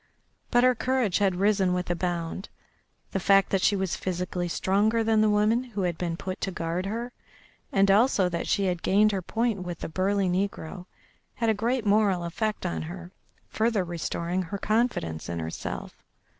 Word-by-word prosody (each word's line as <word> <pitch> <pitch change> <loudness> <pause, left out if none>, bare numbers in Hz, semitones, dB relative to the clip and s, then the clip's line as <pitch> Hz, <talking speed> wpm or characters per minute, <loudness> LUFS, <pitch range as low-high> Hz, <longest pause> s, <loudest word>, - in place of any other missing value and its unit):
But 245 0 +4
her 255 0 +6
courage 245 -4 0
had 195 -3 +2
risen 195 -1 +2
with 180 -1 -2
a - - +1
bound; 175 +2 -3 0.6
the 195 - -1
fact 195 +1 +4
that 195 - +2
she 205 - +3
was 190 -2 -1
physically 180 -1 -3
stronger 205 +6 +1
than 220 -1 +3
the 215 - +4
woman 210 +4 +3
who 210 -6 -4
had 175 -2 0
been 170 -1 -3
put 185 +1 -5
to - - -1
guard 175 +1 -3
her, 235 +4 -4 0.6
and 195 0 +4
also 205 -2 +4
that 170 -1 -3
she 200 - +1
had 180 -2 -1
gained 210 +2 +4
her 195 -2 -1
point 225 +1 -1
with 175 -2 -5
the - - -3
burly 190 +3 +1
negro, 180 -1 -3 0.5
had 230 -1 0
a - - +2
great 230 +3 -1
moral 200 -3 +3
effect 210 +5 -2
on 175 - -2
her, 175 +2 -8 0.4
further 220 -3 +1
restoring 175 +1 -2
her 185 +3 -4
confidence 215 - -1
in 85 - -3
herself. 80 0 -6
195 Hz, 185 wpm, -27 LUFS, 175-215 Hz, 0.6 s, her